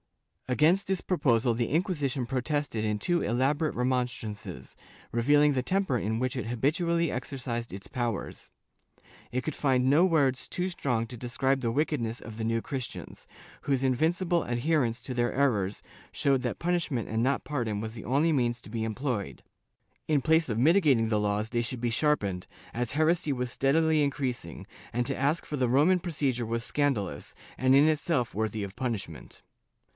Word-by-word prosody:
* - - -13
Against 165 +9 +3
this 190 -1 0
proposal 130 -10 +2
the 115 0 -1
Inquisition 145 - 0
protested 130 -2 -2
in 105 -1 0
two 175 +10 +1
elaborate 140 +7 +1
remonstrances, 120 - -3 0.4
revealing 145 +5 +4
the 130 - +1
temper 190 -2 0
in 110 0 -1
which 130 +1 -1
it 125 -4 -3
habitually 165 +7 +1
exercised 125 -2 -4
its 95 +1 -8
powers. 120 -4 -4 0.8
It 130 - -1
could 155 - -3
find 130 -3 +2
no 150 +5 +5
words 145 -8 +2
too 180 0 -1
strong 125 -10 -1
to 125 - -8
describe 130 +3 0
the 115 -2 0
wickedness 125 -4 -1
of 110 - -9
the 110 - -4
New 115 0 0
Christians, 130 -2 -6 0.3
whose 135 -2 0
invin 130 +4 +3
cible 175 -2 0
adherence 120 -1 +1
to 130 - -4
their 120 -1 +1
errors 105 -8 0 0.3
showed 135 -2 +1
that 125 -2 -3
punishment 170 -9 -1
and 110 +1 0
not 135 +2 0
pardon 115 -8 -2
was 110 +1 -5
the 115 - -8
only 145 +7 +2
means 120 -3 +1
to - - -12
be 110 0 -3
employed; 115 -1 -3 0.6
in 150 -2 +3
place 160 +2 +3
of 110 - -1
mitigating 140 - +4
the 105 -1 +2
laws 105 +1 0
they 120 0 0
should 120 +1 -3
be 120 0 -1
sharpened, 105 -10 0 0.3
as 120 +1 -1
heresy 160 +1 +2
was 125 -2 -2
steadily 155 +3 +3
increas 135 -3 -2
ing, 85 - -9 0.3
and 120 +2 -1
to - - -2
ask 145 +5 0
for 150 - -4
the 130 -4 +1
Roman 155 +9 +4
procedure 140 -9 -1
was 115 0 -2
scandalous, 105 - -1 0.2
and 130 +1 +3
in 145 +3 +6
itself 155 -5 0
worthy 110 0 -2
of 100 0 -7
punishment. 105 -10 -5
130 Hz, 175 wpm, -28 LUFS, 115-150 Hz, 0.8 s, in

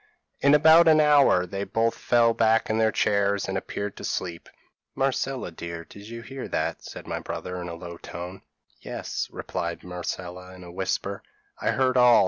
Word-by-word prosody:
In 140 +1 +5
about 160 +3 +7
an 155 -1 +7
hour 145 -11 +5
they 100 +2 -4
both 115 +2 +1
fell 120 -1 +3
back 115 -1 +2
in 110 - +1
their 110 0 +3
chairs 100 -1 +1
and 95 - -3
appeared 100 +1 -4
to - - -9
sleep. 85 -2 -4 0.5
"'Marcella, 135 -5 -1
dear, 85 0 -7
did 100 +2 -12
you 115 0 -7
hear?' 135 +2 -7 0.3
said - - -10
my - - -3
brother, 90 0 -5
in 90 - -5
a 85 - -5
low 85 0 -8
tone. 90 +3 -8 0.4
"'Yes,' - - -4
replied 85 0 -4
Marcella 90 +1 -6
in 90 - -12
a 90 - -10
whisper, 95 +2 -2 0.4
'I - - +1
heard 130 0 +2
all. 125 -1 +7
100 Hz, 175 wpm, -26 LUFS, 90-125 Hz, 0.5 s, about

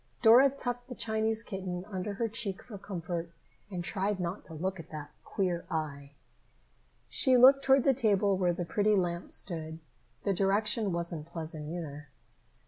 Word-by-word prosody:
Dora 245 +5 +8
tucked 245 -2 -4
the 250 - -6
Chinese 220 0 0
kitten 185 -4 -5
under 200 0 -4
her 230 +3 0
cheek 210 -3 -2
for 210 -5 -9
comfort 175 -3 -4 0.4
and 180 -3 -4
tried 195 +1 -1
not 180 +2 -3
to 165 - -9
look 185 +3 -3
at 165 - -10
the 150 -2 -7
queer 180 -4 -1
eye. 145 -3 -4 0.9
She 260 -3 +4
looked 270 +3 +7
toward 270 -1 +5
the 275 - +4
table 205 -5 +2
where 180 -2 +2
the 175 0 -3
pretty 210 +4 +2
lamp 175 -2 -1
stood. 160 -3 -2 0.5
That 200 - +1
direction 205 +2 +2
wasn't 170 -2 -1
pleasant 160 -2 -6
either. 150 -3 -6
190 Hz, 160 wpm, -30 LUFS, 170-220 Hz, 0.9 s, Dora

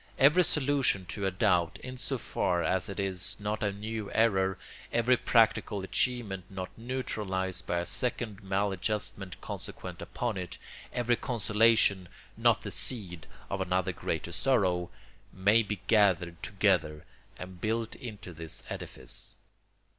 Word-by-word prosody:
Every 150 +7 +6
solution 135 - +2
to 100 -1 -2
a - - +3
doubt, 90 -4 +2
in 130 0 -6
so 130 +1 -3
far 90 -6 0
as 95 +1 0
it 100 - -5
is 95 0 -2
not 105 +1 -2
a 105 - +1
new 105 +1 -5
error, 95 -4 +3 0.3
every 120 +2 +4
practical 110 -4 +3
achievement 100 -3 0
not 95 -1 -6
neutralised 105 -6 -2
by 85 - +1
a 85 - -1
second 115 -3 -1
maladjustment 95 0 -2
consequent - - -7
upon 120 -4 -3
it, 90 -2 -5 0.3
every 120 -1 +1
consolation 110 -5 +3 0.3
not - - +3
the - - -4
seed 90 -10 -3 0.2
of 100 -1 -2
another 95 0 +1
greater - - -3
sorrow, 90 -9 +2 0.4
may 100 +4 +4
be 105 -3 -4
gathered 90 -6 +3
together 90 -7 +1 0.3
and 90 -1 -9
built 115 +1 -1
into 105 -7 -8
this 80 -1 -6
edifice. - - -6
100 Hz, 135 wpm, -30 LUFS, 95-115 Hz, 0.4 s, Every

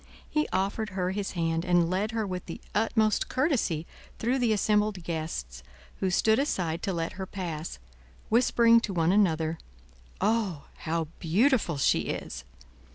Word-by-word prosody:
He 305 0 0
offered 200 +3 -1
her 180 0 0
his 200 0 -3
hand, 165 -2 0
and 175 -2 +3
led 190 +5 0
her 225 -1 -1
with 185 -2 -5
the 165 - -6
utmost 215 0 +2
courtesy 255 - 0 0.3
through 250 +4 0
the 240 -3 +2
assembled 210 -2 +1
guests, 155 - -4 0.4
who 190 - +1
stood 220 +5 +3
aside 175 - -1
to 195 - -1
let 165 -2 -2
her 190 - -4
pass, 170 -5 -5 0.5
whispering 230 0 +5
to 210 -4 -4
one 165 0 +3
another, 165 -5 +2 0.6
"Oh, 205 -7 0
how 160 -1 -2
beautiful 195 - +2
she 135 - +3
is!" - - -5
190 Hz, 150 wpm, -28 LUFS, 165-220 Hz, 0.6 s, whispering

